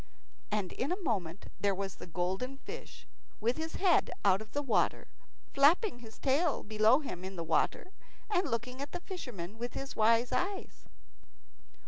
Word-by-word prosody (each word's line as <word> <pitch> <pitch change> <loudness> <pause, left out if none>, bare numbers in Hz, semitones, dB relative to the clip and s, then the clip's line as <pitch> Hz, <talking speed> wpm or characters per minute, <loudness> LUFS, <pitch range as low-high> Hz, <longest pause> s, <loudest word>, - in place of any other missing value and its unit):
And 205 -3 -1
in 270 - -2
a 365 - -1
moment 190 - -2
there 200 -1 +2
was 195 -1 -4
the - - -9
golden 190 +10 -2
fish - - -9 0.3
with 235 +3 +1
his 320 0 -4
head 370 -3 +4 0.2
out 195 0 +5
of 220 - -10
the 290 - -1
water, 255 - +1 0.5
flapping 295 - +4
his 225 -2 -12
tail 290 +3 +2
below 220 +6 +4
him 185 - -6
in 190 +1 -6
the 170 - -3
water, 165 - +1 0.4
and 360 -6 +1
looking 250 +3 -3
at 285 - -5
the 355 - -4
fisherman 225 - -6
with 240 +1 -4
his 275 - -5
wise 230 +3 +4
eyes. 380 +10 -2
240 Hz, 165 wpm, -32 LUFS, 200-290 Hz, 0.5 s, out